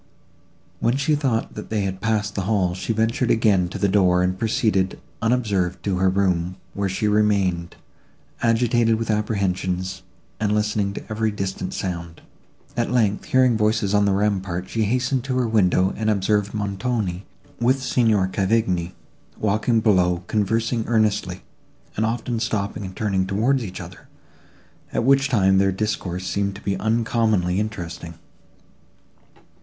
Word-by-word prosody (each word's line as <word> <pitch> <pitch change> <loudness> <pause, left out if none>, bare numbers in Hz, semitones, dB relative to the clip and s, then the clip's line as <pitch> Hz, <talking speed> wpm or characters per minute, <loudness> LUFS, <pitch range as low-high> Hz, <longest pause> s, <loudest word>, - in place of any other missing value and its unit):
When 120 +3 +1
she 140 +2 +1
thought 135 -6 0
that 105 - -8
they 110 -2 0
had 95 -1 -3
passed 105 -2 0
the 100 - -2
hall, 95 -5 +2
she 95 +5 -3
ventured 115 +2 0
again 100 -6 +3
to - - -6
the 100 - +1
door, 90 -2 +3
and 90 0 0
proceeded, 105 -2 0 0.2
unobserved, 105 -7 0
to 95 -3 0
her 95 0 +3
room, 90 -2 0 0.2
where 100 -1 -1
she 95 +3 -1
remained, 100 -5 +1 0.7
agitated 115 0 +3
with 110 0 -2
apprehensions, 95 -3 -1 0.4
and 105 -1 +1
listening 105 -2 0
to - - -7
every 110 0 -1
distant 100 -2 -4
sound. 85 -3 -5 0.5
At 120 - 0
length, 110 -5 +1
hearing 130 -2 +3
voices 105 -2 +1
on 105 0 +4
the 100 - +2
rampart, 95 -3 -1
she 110 -1 0
hastened 125 +3 0
to 130 -1 -1
her 125 -2 +1
window, 95 -3 +2
and 110 +1 -1
observed 105 0 +1
Montoni, 100 -2 -2 0.4
with 130 +3 +2
Signor 110 -7 +2
Cavigni, 95 -3 0 0.4
walking 110 +2 +1
below, 90 -5 +2
conversing 115 +4 0
earnestly, 105 -5 0 0.5
and 110 +1 +1
often 115 0 -2
stopping 105 -3 -2
and 95 0 -8
turning 95 -3 0
towards 120 +7 +1
each 95 -4 -7
other, - - -11 0.8
at - - 0
which 135 +2 +4
time 95 -6 +3
their 95 0 +3
discourse 95 -2 -3
seemed 100 0 -1
to 100 - -10
be 100 -1 0
uncommonly 110 -4 +1
interesting. 85 -5 -5
105 Hz, 150 wpm, -22 LUFS, 95-115 Hz, 0.8 s, on